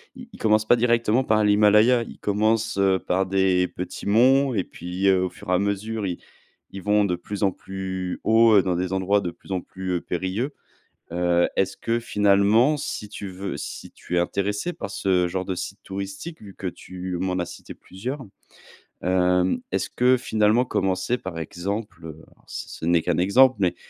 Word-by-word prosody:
ils 240 -3 -12
commencent 110 0 +2
pas 120 - +6
directement 120 +1 +2
par 110 -2 +2
l'Himalaya. 105 +4 +5
Ils - - -11
commencent, 110 +1 0
heu, 95 -1 +3
par 95 +1 0
des 95 -1 +2
petits 90 0 -7
monts 130 +5 +4
et 95 -4 0
puis 90 +3 -2
au 95 -1 +1
fur - - -12
et - - +2
à 90 - +3
mesure, 100 +2 -2
ils 90 - -4 0.5
ils 95 - -7
vont 105 0 +3
de 90 -2 0
plus 100 +4 -6
en 95 - +3
plus 95 -1 -5
haut 110 -2 +6
dans 90 -1 -1
des 90 +1 -2
endroits 95 +2 +1
de 90 -2 -3
plus 95 - -15
en 90 - -1
plus, 95 0 -6
heu, 85 - -1
périlleux. 95 - -3 0.6
Heu, 85 0 +2
est-ce 95 0 0
que 115 +1 -1
finalement, 105 +6 +3
si 105 -6 -5
tu 100 -2 -7
veux 95 +1 -5
si - - -7
tu 90 - -6
es - - +5
intéressé 100 - -1
par - - -6
ce 95 -3 +1
genre 95 +1 -3
de 95 - -3
site - - -6
touristique, 100 - -6
vu 100 -2 -11
que 95 - -5
tu 90 0 -6
m'en 95 0 -1
as 85 - -1
cité 85 - -10
plusieurs, 125 +8 -7 0.8
hem, 90 0 +2
est-ce 95 0 -1
que, 125 +1 +3
finalement, 110 0 +2
commencer 95 +3 0
par 95 -6 -7
exemple- 85 0 -5 0.3
ce - - -7
n'est 85 -1 +3
qu'un 85 -2 0
exemple, 125 +8 +5
mais 90 -2 +1
100 Hz, 185 wpm, -24 LUFS, 90-110 Hz, 0.8 s, pas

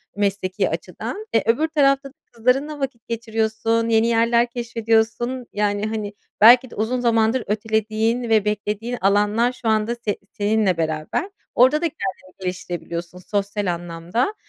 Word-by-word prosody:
mesleki 195 -2 0
açıdan. 425 +2 -5
Eee, 225 - +3
öbür 240 +8 +2
tarafta 275 -3 +2
da - - -23 0.2
kızlarınla 270 +6 0
vakit 255 -4 -5
geçiriyorsun, 225 0 -1
yeni 225 0 +3
yerler 235 +1 +3
keşfediyorsun, 235 +1 0
yani, 205 0 0
hani, 215 -2 -3 0.3
belki 245 +3 +8
de - - -12
uzun 230 +4 -1
zamandır 230 0 +2
ötelediğin 220 +2 0
ve 215 -2 +3
beklediğin 210 +3 -2
alanlar 210 +4 +3
şu 240 - -6
anda 220 +2 +1
se 220 -4 -3
seninle 205 -3 +1
beraber. 160 - -2 0.3
Orada 260 +4 +6
da - - 0
kendini 185 -6 -6
geliştirebiliyorsun 175 -1 -5
sosyal 200 0 -2
anlamda. 175 - -2
220 Hz, 135 wpm, -22 LUFS, 205-240 Hz, 0.3 s, belki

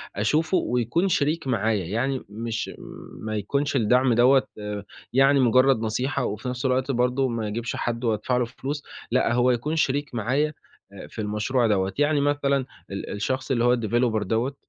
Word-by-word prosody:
أشوفه 155 - +1
ويكون 125 - 0
شريك 155 -2 0
معايا، 110 -6 0
يعني 125 +8 -2
مش 115 +2 -4 0.5
ما 110 0 -3
يكونش 140 +8 -1
الدعم 125 +1 +3
دوَّة 130 +3 +5 0.2
آآ، 105 -1 -5 0.3
يعني 135 +1 +5
مجرد 130 0 +4
نصيحة 120 +5 -1
وفي 105 +5 -4
نفس 125 +1 -4
الوقت 130 +1 +1
برضه 125 +2 +1
ما 115 -3 -2
أجيبش 115 +3 -3
حد 120 0 -3
وأدفع 115 +2 0
له 125 - +1
فلوس، 135 +4 -5 0.3
لأ 125 -1 +2
هو 125 +1 +3
يكون 135 +7 -1
شريك 145 -3 0
معايا، 135 +7 0 0.5
أ - - -10
في 110 - -7
المشروع 110 +4 0
دوَّة، 95 -2 +1
يعني 145 0 +3
مثلًا 140 -2 +1 0.3
ال 100 - -5
الشخص 130 +6 -2
اللي 120 -2 +2
هو 120 0 +4
الDeveloper 115 -1 0
دوَّة 115 +7 -1
125 Hz, 165 wpm, -25 LUFS, 110-135 Hz, 0.5 s, دوَّة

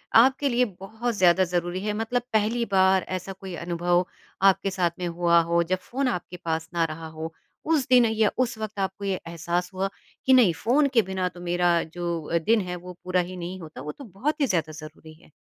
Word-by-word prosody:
आपके 265 +4 +5
लिए 250 +1 +3
बहुत 225 +5 -3
ज़्यादा 185 0 +5
ज़रूरी 175 0 -1
है? 210 - 0
मतलब 225 +3 -1
पहली 220 +2 +2
बार 190 -1 +4
ऐसा 190 +2 -7
कोई 190 -2 -8
अनुभव 175 +1 +1 0.4
आपके 195 +1 0
साथ 180 -3 +1
में 180 - -2
हुआ 170 0 +3
हो, 170 +1 +1
जब 185 +2 0
फ़ोन 260 +8 -2
आपके 180 -5 -3
पास 160 0 -2
ना 170 -1 +2
रहा 160 +1 -8
हो, 160 +1 -5 0.3
उस 305 -5 +2
दिन 250 -2 +6
या 220 -1 +2
उस 245 -3 0
वक़्त 215 -1 -5
आपको 195 +1 -3
ये 195 -2 -1
एहसास 170 +2 -2
हुआ, 190 +1 -1 0.4
कि 265 - +5
नहीं, 235 -10 +6
फ़ोन 265 - +2
के 230 - +6
बिना 190 -1 -2
तो 175 0 -14
मेरा 175 -1 +2
जो 170 0 -2
दिन 225 -1 +4
है, 180 -1 -4
वो 180 +1 -9
पूरा 185 0 +1
ही 180 +1 -7
नहीं 180 +2 -6
होता, 155 -6 -9
वो 150 +2 -5
तो 280 - -12
बहुत 270 - -3
ही - - +5
ज़्यादा 165 -7 0
ज़रूरी 155 +1 -13
है। 155 - -21
185 Hz, 215 wpm, -25 LUFS, 170-220 Hz, 0.4 s, दिन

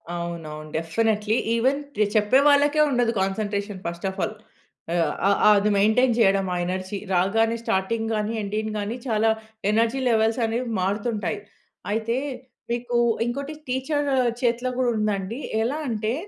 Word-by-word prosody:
అవునవును. 160 -3 -6
Definitely, 210 +6 0 0.2
even 260 +5 +2 0.2
ర్ 210 - +5
చెప్పే 215 +5 +4
వాళ్ళకే 290 +1 +4
ఉండదు 245 -3 +2
కాన్సన్‌ట్రేషన్ 200 0 -2
ఫస్ట్ 170 +2 -4
ఆఫ్ 190 - -8
ఆల్. 215 - -3 0.6
అ - - +1 0.3
అ - - +5 0.3
అది 210 +1 +1
మెయింటైన్ 220 +5 +4
చేయడం 195 -3 +4
ఆ - - -1
ఎనర్జీ 185 +2 -3 0.2
రాగానే 225 +6 +2
స్టార్టింగ్ 225 +3 -1
గాని, 215 +1 -1
ఎండింగ్ 215 +1 -3
గాని 210 +4 -3
చాలా 225 -1 +2 0.4
ఎనర్జీ 230 +4 +2
లెవెల్స్ 225 +1 +2
అనేవి 235 +2 -2
మారుతుంటాయి. 210 +2 -1 0.5
అయితే, 225 +2 0 0.6
మీకు 240 0 -2 0.3
ఇంకోటి 280 +5 -3
టీచర్ 285 +3 -1 0.3
చేతిలో 245 +1 +1
కూడా 255 -1 +2
ఉందండి. 210 +2 -1 0.2
ఎలా 270 +7 -1
అంటే, 220 0 -1
220 Hz, 135 wpm, -24 LUFS, 200-240 Hz, 0.6 s, ర్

